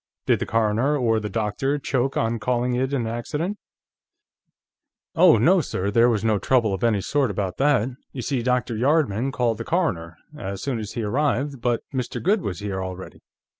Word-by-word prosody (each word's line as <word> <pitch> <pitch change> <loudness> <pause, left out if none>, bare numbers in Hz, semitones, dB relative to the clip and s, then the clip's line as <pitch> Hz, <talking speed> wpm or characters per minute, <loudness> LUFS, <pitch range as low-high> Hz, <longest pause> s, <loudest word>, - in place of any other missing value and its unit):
"Did - - +3
the - - -3
coroner 115 +6 +1
or 115 -4 +2
the 105 -1 -4
doctor 110 +7 -1
choke 135 -1 -1
on 115 0 0
calling 125 +1 0
it 130 +2 0
an 130 -5 -1
accident?" 150 - -3 1.5
"Oh 170 -5 +6
no, 175 - +4
sir; 100 -8 -2
there 115 +3 +5
was 110 -3 0
no 110 -2 +2
trouble 115 -4 +2
of 95 - -4
any 110 -4 +2
sort 140 +3 +1
about 95 -2 -3
that. 135 -4 +2 0.2
You 125 - -6
see, 135 -2 -1
Dr. 125 -1 0
Yardman 135 -1 +1
called 120 -4 0
the - - -3
coroner, 90 - -1 0.2
as 100 -8 -5
soon 130 -2 -2
as 105 -1 -6
he 115 - -3
arrived, 140 +3 -1
but 120 -1 0
Mr. 125 -2 -3
Goode 200 +3 +2
was 100 - -4
here 95 -2 -3
already. 95 0 -8
120 Hz, 185 wpm, -23 LUFS, 105-140 Hz, 1.5 s, Oh